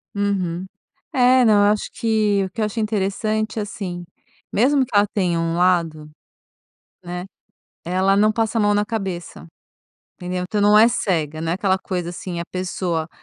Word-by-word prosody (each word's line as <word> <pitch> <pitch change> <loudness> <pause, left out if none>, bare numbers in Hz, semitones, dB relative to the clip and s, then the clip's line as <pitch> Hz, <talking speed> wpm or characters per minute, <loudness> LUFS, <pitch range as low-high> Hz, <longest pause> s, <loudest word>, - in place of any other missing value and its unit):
Uhum. 190 -3 -1 0.5
É, 255 0 +5
não, 205 -2 +5
eu 205 - +5
acho 210 - -4
que 215 -4 +1
o 190 - -6
que 220 - -5
eu - - +2
achei 215 +2 -3
interessante, 215 +1 -1
assim 190 -4 -5 0.5
mesmo 265 +4 +3
que 235 - -8
ela 205 0 +5
tenha 180 -4 0
um 165 0 -1
lado, 170 -4 +1 1.0
né, 180 +1 -5 0.6
ela 185 +2 +2
não 215 +1 +4
passa 225 +1 -1
a 220 - +3
mão 205 0 +3
na 205 0 +1
cabeça, 190 - -5 0.7
entendeu? 180 0 -4
Então 205 +3 -2
não 210 +1 +6
é 225 +2 +7
cega. 160 -9 -1
Não 165 0 -1
é - - +1
aquela 190 0 +1
coisa 180 -2 -4
assim: 175 -1 -6
"A - - -4
pessoa 180 -3 -2
195 Hz, 170 wpm, -21 LUFS, 175-215 Hz, 1.0 s, é